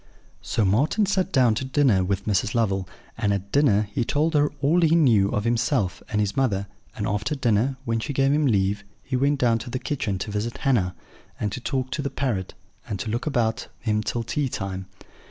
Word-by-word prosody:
"So 110 - 0
Marten 140 - +2
sat 190 -1 0
down 125 -7 +4
to 110 - -2
dinner 130 -8 +3
with 100 +1 -2
Mrs. 105 +1 0
Lovel; 95 -5 0 0.3
and 105 -3 +1
at 100 0 -3
dinner 110 -8 +3
he 120 - 0
told 155 +7 +1
her 145 -1 +3
all 160 +6 +3
he 165 0 +4
knew 115 -12 +4
of 105 - -1
himself 115 - 0
and 105 - 0
his 105 -1 0
mother; 105 -8 +1 0.3
and - - -2
after 105 +8 -1
dinner, 125 0 +1
when 115 0 0
she 145 - -4
gave 135 0 +2
him 150 -1 +2
leave, 100 -2 +1 0.2
he 130 - -3
went 140 +3 +2
down 115 -3 +2
to 120 - -7
the 130 - -2
kitchen 120 -8 -2
to 100 +3 -4
visit 105 +3 -3
Hannah, 100 -10 +1 0.4
and 105 - -1
to 125 - -5
talk 130 -1 -2
to 150 - -2
the 140 - -2
parrot, 110 -10 -2 0.3
and 105 -5 -4
to 110 - -3
look 120 +6 -2
about 120 -4 0
him 105 -2 0
till 115 +2 -2
tea 140 +4 -1
time. 95 -4 -4
115 Hz, 210 wpm, -24 LUFS, 100-140 Hz, 0.4 s, down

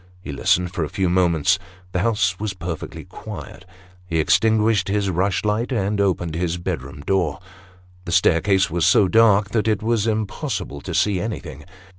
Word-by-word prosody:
He 90 - -8
listened 90 +5 +1
for 85 - -1
a 75 - -3
few 95 -2 0
moments; 90 0 +2 0.3
the 90 - -1
house 100 -3 +1
was 105 -2 -3
perfectly 85 -3 -6
quiet; 90 - -9 0.4
he 85 -2 -1
extinguished 110 +3 +3
his 100 -1 0
rushlight, 105 +6 0
and 100 -3 0
opened 85 -4 0
his 85 +1 -1
bedroom 75 -6 -5
door 85 -2 0 0.7
The 85 - -5
staircase 95 +1 +3
was 85 0 0
so 95 +3 +5
dark 105 -1 +4
that 110 -1 0
it 110 -1 0
was 115 -1 +1
impossible 110 - -3
to 90 +1 -5
see 95 +1 +2
anything. 80 -10 -6
95 Hz, 160 wpm, -21 LUFS, 85-105 Hz, 0.7 s, so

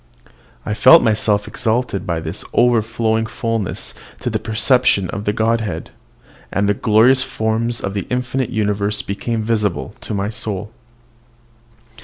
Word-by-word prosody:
I 105 - -1
felt 130 +10 +7
myself 105 -2 +1
exalted 115 -3 -1
by 85 -2 -1
this 80 +4 -5
overflowing 110 -1 +2
fulness 115 -4 -3 0.3
to - - -2
the - - -1
perception 110 -2 +2
of 100 +1 -5
the 105 - +2
Godhead, 110 -5 -1 0.6
and 100 +2 +1
the 105 - +3
glorious 115 +6 +4
forms 115 -2 -1
of 100 0 -4
an 100 - -3
infinite 125 0 -1
universe 105 -2 -1
became 110 +3 -3
visible 105 - -1
to 105 - -4
my 100 +1 -1
soul! 105 -1 -4
110 Hz, 135 wpm, -19 LUFS, 100-115 Hz, 0.6 s, felt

